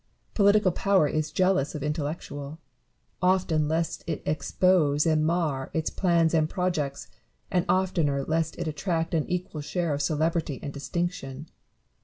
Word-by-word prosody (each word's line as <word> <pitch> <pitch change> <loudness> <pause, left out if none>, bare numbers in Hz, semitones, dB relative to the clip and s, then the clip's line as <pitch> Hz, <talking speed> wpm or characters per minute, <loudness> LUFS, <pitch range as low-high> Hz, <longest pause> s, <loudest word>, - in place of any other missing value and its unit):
Political 205 -2 +4
power 190 -3 +3
is 155 +1 -1
jealous 185 -6 +1
of 150 - -4
in 150 0 0
tellectual; 145 -1 -5 0.6
often 180 -5 +2
lest 165 +1 -1
it 160 - -3
expose 155 -2 +2
and 155 -1 +3
mar 155 -5 0
its 160 -1 0
plans 170 -3 +2
and 155 -1 +2
projects, 160 -7 -2 0.4
and 180 -2 +1
oftener 165 -7 +1
lest 160 0 0
it 175 - -3
attract 165 +3 -2
an 160 -3 0
equal 180 -4 -3
share 170 +1 -1
of 145 - -2
celebrity 155 -1 0
and 140 - -5
distinction. 145 -1 -4
160 Hz, 145 wpm, -27 LUFS, 150-175 Hz, 0.6 s, Political